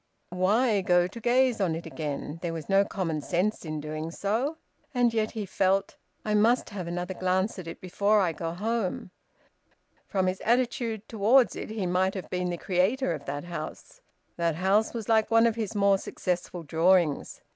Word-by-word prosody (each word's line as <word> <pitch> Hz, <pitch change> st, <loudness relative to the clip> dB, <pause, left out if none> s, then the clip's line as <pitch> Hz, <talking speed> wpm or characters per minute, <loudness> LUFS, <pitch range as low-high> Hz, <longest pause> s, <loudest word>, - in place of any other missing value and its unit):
Why 205 Hz, +4 st, +2 dB
go 175 Hz, -2 st, +3 dB
to 195 Hz, +6 st, -7 dB
gaze 245 Hz, -1 st, +2 dB
on 170 Hz, -4 st, +1 dB
it 165 Hz, -, -6 dB
again? 150 Hz, 0 st, -5 dB
There 170 Hz, -2 st, -3 dB
was 160 Hz, -2 st, -6 dB
no 195 Hz, 0 st, +4 dB
common 170 Hz, -6 st, -3 dB
sense 185 Hz, +7 st, -1 dB
in 155 Hz, -2 st, -4 dB
doing 155 Hz, +1 st, -5 dB
so. 225 Hz, -, -1 dB, 0.4 s
And 240 Hz, -2 st, +3 dB
yet 220 Hz, -1 st, 0 dB
he 210 Hz, -, -2 dB
felt: 195 Hz, +1 st, +1 dB, 0.3 s
"I 215 Hz, -, 0 dB
must 225 Hz, +3 st, +3 dB
have 185 Hz, -4 st, -5 dB
another 175 Hz, +2 st, -3 dB
glance 185 Hz, +2 st, 0 dB
at 175 Hz, -, -8 dB
it 165 Hz, -, -7 dB
before 200 Hz, +3 st, +2 dB
I 185 Hz, -4 st, +2 dB
go 165 Hz, +1 st, -4 dB
home." 205 Hz, 0 st, -2 dB, 1.0 s
From 190 Hz, -2 st, 0 dB
his 185 Hz, 0 st, -1 dB
attitude 235 Hz, -2 st, 0 dB
towards 230 Hz, +4 st, +3 dB
it, -, -, -6 dB
he 215 Hz, -3 st, -3 dB
might 185 Hz, +2 st, +1 dB
have 190 Hz, -, -6 dB
been 180 Hz, 0 st, -1 dB
the 175 Hz, -, -3 dB
creator 185 Hz, +5 st, +1 dB
of 145 Hz, -3 st, -7 dB
that 145 Hz, +1 st, -4 dB
house. 170 Hz, -3 st, -8 dB, 0.4 s
That 170 Hz, -2 st, +1 dB
house 195 Hz, +5 st, +2 dB
was 225 Hz, -3 st, -5 dB
like 220 Hz, -1 st, +3 dB
one 225 Hz, 0 st, +5 dB
of 230 Hz, -, +3 dB
his 225 Hz, -1 st, -4 dB
more 200 Hz, -1 st, +4 dB
successful 180 Hz, -2 st, -3 dB
drawings. 165 Hz, 0 st, +2 dB
190 Hz, 185 wpm, -27 LUFS, 175-220 Hz, 1.0 s, one